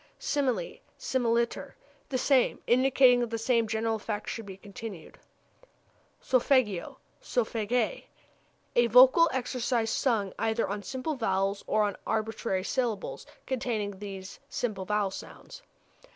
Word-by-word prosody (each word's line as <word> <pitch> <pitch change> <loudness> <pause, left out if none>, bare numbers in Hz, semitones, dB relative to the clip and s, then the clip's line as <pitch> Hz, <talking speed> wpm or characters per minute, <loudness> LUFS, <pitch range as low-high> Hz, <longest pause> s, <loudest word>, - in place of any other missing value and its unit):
Simile, 285 - -1 0.2
similiter 235 -2 0 0.4
the 260 - 0
same; 260 0 +2
indicating 255 0 +5
that 240 -1 -1
the 230 - -2
same 230 0 +1
general 225 0 0
effect 210 0 -4
is - - -3
to - - -6
be 195 -2 -9
continued. 205 -3 -9 1.0
Solfeggio, 250 -7 +1 0.2
solfège 250 - -1 0.7
a 240 0 +5
vocal 260 +8 +7
exercise 245 -3 -1
sung 220 -8 0
either 225 +1 0
on 205 +1 -3
simple 260 +8 -3
vowels 195 -5 -1
or 215 - +2
on 205 -1 -1
arbitrary 220 -3 -1
syllables 230 -2 -2 0.2
containing 220 -6 -2
these 195 -2 -8
simple 205 -6 -3
vowel 210 -1 0
sounds. - - -10
230 Hz, 125 wpm, -29 LUFS, 205-255 Hz, 1.0 s, vocal